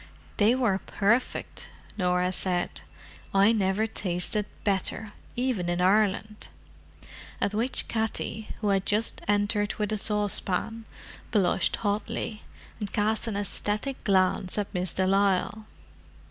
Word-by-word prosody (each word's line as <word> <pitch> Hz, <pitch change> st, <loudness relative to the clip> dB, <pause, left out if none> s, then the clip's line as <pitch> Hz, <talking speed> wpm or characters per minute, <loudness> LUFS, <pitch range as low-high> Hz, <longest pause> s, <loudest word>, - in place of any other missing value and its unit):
"They 220 Hz, +4 st, +4 dB
were 225 Hz, -7 st, +1 dB
perfect," 220 Hz, +7 st, -1 dB, 0.3 s
Norah 180 Hz, -1 st, +1 dB
said. 180 Hz, -1 st, 0 dB, 0.5 s
"I 200 Hz, +3 st, +6 dB
never 205 Hz, -1 st, +1 dB
tasted 205 Hz, 0 st, -1 dB, 0.2 s
better, 200 Hz, +1 st, 0 dB, 0.2 s
even 240 Hz, -8 st, 0 dB
in 175 Hz, 0 st, 0 dB
Ireland." 210 Hz, +2 st, +1 dB, 0.9 s
At 200 Hz, -, 0 dB
which 235 Hz, +5 st, +1 dB
Katty, 220 Hz, -1 st, -2 dB
who 210 Hz, -, +1 dB
had 195 Hz, -1 st, +1 dB
just 215 Hz, +2 st, +1 dB
entered 205 Hz, 0 st, +1 dB
with 210 Hz, -1 st, -1 dB
a 215 Hz, -, +1 dB
saucepan, 210 Hz, +1 st, 0 dB, 0.4 s
blushed 195 Hz, -3 st, +2 dB
hotly, 210 Hz, +1 st, -2 dB, 0.4 s
and 205 Hz, -2 st, -4 dB
cast 215 Hz, +2 st, 0 dB
an 210 Hz, -3 st, -2 dB
ecstatic 210 Hz, +5 st, -3 dB
glance 185 Hz, -1 st, +2 dB
at 205 Hz, 0 st, -2 dB
Miss 180 Hz, -2 st, -1 dB
de 190 Hz, -, 0 dB
Lisle. 200 Hz, +2 st, +1 dB
205 Hz, 120 wpm, -27 LUFS, 190-215 Hz, 0.9 s, I